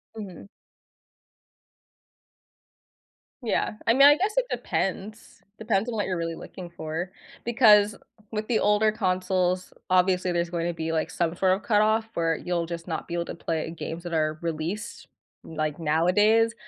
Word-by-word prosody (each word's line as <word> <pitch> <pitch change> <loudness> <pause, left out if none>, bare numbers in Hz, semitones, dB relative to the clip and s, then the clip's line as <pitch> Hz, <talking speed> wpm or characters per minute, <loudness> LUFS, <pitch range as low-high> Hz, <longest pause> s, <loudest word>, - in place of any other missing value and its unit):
Mhm. 200 -3 -9 3.0
Yeah. 230 - 0 0.2
I 230 - +6
mean, 275 +3 +8
I 290 - +8
guess 400 +5 0
it - - +3
depends. 205 +3 -3 0.2
Depends 220 0 0
on 235 - -3
what 210 - 0
you're 185 - -2
really 165 0 -3
looking 180 +1 -9
for 165 +2 -5 0.3
because 215 -4 +5 0.4
with 215 -1 -3
the 235 - +2
older 210 +1 +3
consoles, 185 -3 0 0.2
obviously, 185 0 +3
there's 170 0 0
going 170 -1 -2
to 175 - -1
be, 160 -1 -3
like, 160 -1 -1
some 170 -1 -1
sort 185 +1 +2
of 195 +2 -3
cutoff 215 +1 +3
where 165 -3 +1
you'll 175 -1 -2
just 170 +1 -7
not 165 - -4
be 170 - -6
able 170 0 -1
to - - -6
play 160 -1 -3
games 165 +2 -6
that 175 -1 -6
are 155 -1 0
released, 170 +6 -4 0.4
like, 155 -1 -3
nowadays, 205 +9 +3
185 Hz, 160 wpm, -26 LUFS, 170-215 Hz, 3.0 s, mean